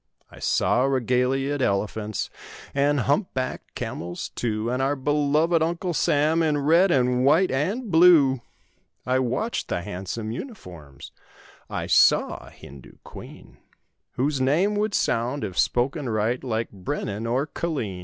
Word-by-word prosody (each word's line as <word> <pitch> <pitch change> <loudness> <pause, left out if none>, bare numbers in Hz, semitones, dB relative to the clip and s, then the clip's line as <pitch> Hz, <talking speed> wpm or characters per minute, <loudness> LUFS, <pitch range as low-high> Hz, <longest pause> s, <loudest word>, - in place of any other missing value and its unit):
I - - -13
saw 125 - +1
regaliaed 135 +2 0
elephants 105 0 -2 0.4
And 140 0 +2
hump 145 - 0
backed 130 -1 -4
camels, 85 +1 -5
too; 110 0 -2
And 125 +1 -1
our 135 +2 +1
beloved 150 +4 +1
Uncle 170 +2 -1
Sam 155 +3 +2
In 155 -2 +1
red 165 +7 +4
and 125 -4 +2
white 160 +7 +4
and 195 - -2
blue. 160 -7 +5 0.6
I 130 +1 +1
watched 130 - -2
the 85 - -3
handsome 105 +3 -5
uniforms; 85 - -9 0.6
I - - -3
saw - - +3
a - - -11
Hindoo 70 -1 -14
queen— - - -12 0.6
Whose 135 +2 -1
name 165 +11 +2
would 210 0 0
sound, 120 +4 0
if 95 -4 -3
spoken 135 +3 0
right, 110 +3 -1
Like 115 -3 -2
Brennan 105 +1 -4
or 130 +5 0
Killeen. 140 - -4
130 Hz, 135 wpm, -24 LUFS, 115-150 Hz, 0.6 s, blue